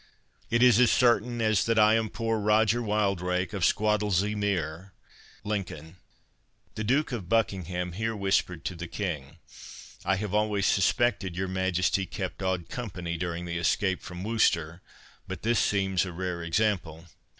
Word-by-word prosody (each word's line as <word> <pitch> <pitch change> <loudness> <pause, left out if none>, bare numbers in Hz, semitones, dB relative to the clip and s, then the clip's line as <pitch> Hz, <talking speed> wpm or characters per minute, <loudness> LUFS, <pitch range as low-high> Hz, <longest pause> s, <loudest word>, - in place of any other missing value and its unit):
It 115 +1 +3
is 125 -3 +6
as 125 -2 +6
certain 120 -1 +2
as 110 -3 +2
that 115 0 +1
I 110 0 +6
am 110 -1 +1
poor 115 0 -1
Roger 110 +2 +3
Wildrake 100 -3 0
of 100 - -4
Squattlesea 105 0 +2
mere, 95 -3 -2 0.5
Lincoln." 90 -6 -4 0.8
The 110 - -4
Duke 135 +7 +1
of 100 -8 -5
Buckingham 90 -5 0
here 110 +5 -2
whispered 95 -5 0
to - - -2
the 85 0 -7
King, 80 -7 -5 0.7
"I 95 +1 +2
have 100 0 -4
always 105 -2 +1
suspected 100 -2 +1
your 95 +2 -2
Majesty 95 0 0
kept 95 -1 -5
odd 95 -3 -1
company 90 -8 -5
during 85 0 -3
the 85 0 -3
escape 95 +2 +1
from 90 0 -8
Worcester, 90 -7 +1 0.5
but - - -7
this 115 -1 +2
seems 95 -1 +1
a 95 - -5
rare 85 -1 -4
sample." 90 -6 0
95 Hz, 150 wpm, -28 LUFS, 90-110 Hz, 0.8 s, is